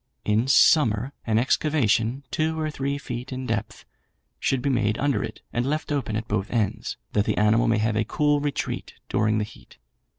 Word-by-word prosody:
In 110 +4 +2
summer 135 -3 +4
an 110 -1 +2
excavation, 125 -2 +1
two 160 +4 0
or 155 -1 -1
three 140 0 -2
feet 125 -2 -6
in 130 0 -4
depth, 115 -2 -3 0.5
should 135 - +1
be 140 - +1
made 110 -4 +1
under 145 -1 +1
it, - - -7
and 120 - 0
left 150 +4 -2
open 130 -7 -1
at 110 +1 -3
both 100 -1 -1
ends, 110 -5 -1 0.2
that 105 -1 +2
the - - 0
animal 105 +2 +3
may 115 -1 +3
have 110 0 0
a 110 - +2
cool 145 +4 +1
retreat 145 0 -3
during 110 0 +2
the 105 - +1
heat. 105 - -13
120 Hz, 190 wpm, -25 LUFS, 110-140 Hz, 0.5 s, summer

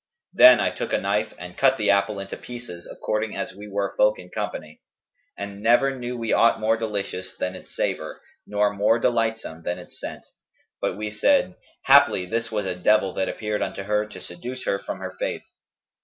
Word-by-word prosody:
Then - - +9
I - - +1
took - - -4
a - - +4
knife 105 +2 -1
and 90 0 -9
cut 135 -1 +4
the 105 -2 +3
apple 100 +1 +2
into 100 0 -6
pieces 120 -8 -9
according 110 0 -2
as - - -4
we 105 +2 -10
were 100 -1 -2
folk 105 0 +4
in 90 0 -12
company; 75 0 -5 0.6
and 100 0 -6
never 120 +5 +4
knew 125 -1 -5
we 115 -1 -1
aught 115 - +4
more 110 +1 +2
delicious 100 -4 -4
than 90 - -2
its 95 - -13
savour - - -2 0.3
nor 105 0 +1
more 105 +3 +3
delightsome 115 -8 -1
than 90 +1 -3
its - - -13
scent; - - -7 0.6
but - - -1
we 105 0 -4
said, 185 - +3 0.3
'Haply 140 -9 +6
this 115 +5 -2
was 105 -2 -1
a 95 - -1
devil 95 +1 +2
that 95 - -1
appeared 105 -1 -3
unto 100 - -3
her 105 +1 0
to 105 - -11
seduce 125 +9 -7
her 100 - 0
from - - -5
her - - -6
faith.' - - -3
105 Hz, 195 wpm, -24 LUFS, 100-115 Hz, 0.6 s, Then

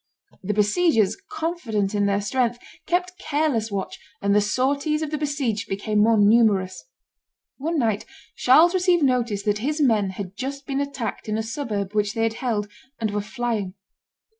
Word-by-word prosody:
The 205 +2 -2
besiegers, 215 - +3
confident 315 - -2
in 205 -1 +1
their 200 0 +1
strength, 240 +3 0 0.3
kept 360 +1 -1
careless 285 -8 0
watch, 195 -1 -4 0.2
and 200 0 +1
the 210 - +5
sorties 280 +8 0
of 305 - -4
the 305 - -1
besieged 280 -8 -2
became 210 +2 -1
more 225 +1 +4
numerous. 205 - +3 0.7
One 320 +4 -2
night 220 -6 0 0.3
Charles 315 +8 +5
received 360 -3 +3
notice 240 -6 +1
that 210 -1 0
his 295 +7 -2
men 220 -8 +3
had 190 0 -7
just 275 +3 -5
been 275 0 -1
attacked 275 -6 -4
in 215 - 0
a 220 - -1
suburb 215 -5 -3
which 210 -1 0
they 225 - 0
had 225 -1 +1
held, 220 -5 -1 0.3
and 220 -2 -1
were 205 0 -1
flying. 215 -3 -3
225 Hz, 165 wpm, -23 LUFS, 205-285 Hz, 0.7 s, the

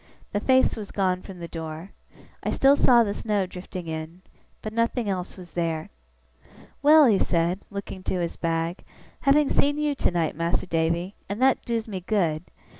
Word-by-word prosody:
The 205 - 0
face 260 +4 +3
was 210 -3 -7
gone 185 -2 0
from 190 -1 -10
the 170 -1 -7
door. 160 +2 -7 0.5
I - - -2
still 275 +1 +5
saw 245 -4 +5
the 200 -2 -2
snow 205 -2 -1
drifting 180 -1 -8
in; 160 +3 -6 0.4
but 215 - -5
nothing 230 0 0
else 185 -1 -3
was 180 -2 -11
there. 165 -2 -2 0.9
'Well!' 300 +1 +7
he 215 -6 +4
said, 170 +1 +1
looking 200 -1 -6
to 185 - -1
his 170 -1 -2
bag, 165 +1 -2 0.4
'having 290 +1 +4
seen 290 +1 +2
you 300 -1 +1
tonight, 175 - 0
Mas'r 170 +3 0
Davy 170 +2 0 0.2
(and 200 +2 -3
that 265 +1 +3
doos 230 -2 -2
me 195 -4 -4
good!) 175 -4 0
185 Hz, 175 wpm, -25 LUFS, 170-230 Hz, 0.9 s, Well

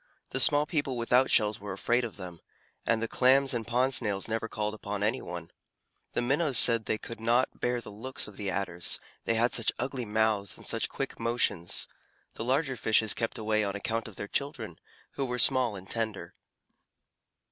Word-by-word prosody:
The - - -2
small 145 -1 +5
people 145 -6 -2
without 125 +3 +3
shells 105 -2 +3
were 100 -1 -6
afraid 120 +6 +1
of 115 -3 -6
them, 90 -3 -8 0.5
and 115 -1 +2
the - - 0
Clams 130 +3 +3
and 115 -2 -3
Pond 125 +3 +1
Snails 105 -6 0
never 115 0 -2
called 105 -1 -3
upon 105 -1 -4
any 115 +5 0
one. 85 -1 -7 0.6
The - - 0
Minnows 140 +1 +2
said 115 -2 +7
they 110 - 0
could 115 +1 -8
not 120 +3 +1
bear 120 0 0
the 110 - -9
looks 130 +7 -2
of 105 - -12
the 100 -1 -4
Adders 90 -2 +1 0.3
they 115 - +1
had 120 +2 +2
such 115 - +2
ugly 130 -1 -3
mouths 105 -2 +1
and - - -11
such - - 0
quick - - -5
motions. 115 -7 0 0.5
The - - -5
larger 135 +2 0
fishes 110 0 +2
kept 115 - -3
away 110 0 0
on 100 -1 -2
account 115 +3 -2
of 110 - -11
their 100 - -6
children, 115 - -3 0.3
who 140 - -3
were 125 -1 -3
small 125 -2 +3
and 95 0 -10
tender. 110 -7 -3
115 Hz, 190 wpm, -29 LUFS, 105-125 Hz, 0.6 s, said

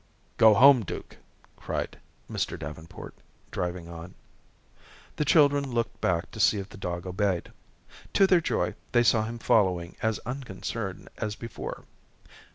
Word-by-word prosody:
"Go 110 -1 +7
home, 130 +3 +8
Duke," - - -7 0.4
cried - - -4 0.3
Mr. - - -2
Davenport, 80 +3 -9 0.4
driving 90 -1 -3
on. 85 +1 -9 1.0
The 150 - +1
children 145 0 +4
looked 115 -2 -2
back 85 -1 0
to 110 - -9
see 105 +1 +4
if 100 0 -5
the - - -12
dog 85 -3 -4
obeyed. 95 -1 -1 0.6
To 195 - +6
their 185 -3 +4
joy, 90 - 0 0.2
they 120 -1 +5
saw 110 -2 +3
him 115 +1 -5
following 90 -6 +2
as 110 -2 +1
unconcerned 105 -5 -5
as 105 -2 -2
before. 115 0 -7
105 Hz, 140 wpm, -27 LUFS, 90-120 Hz, 1.0 s, home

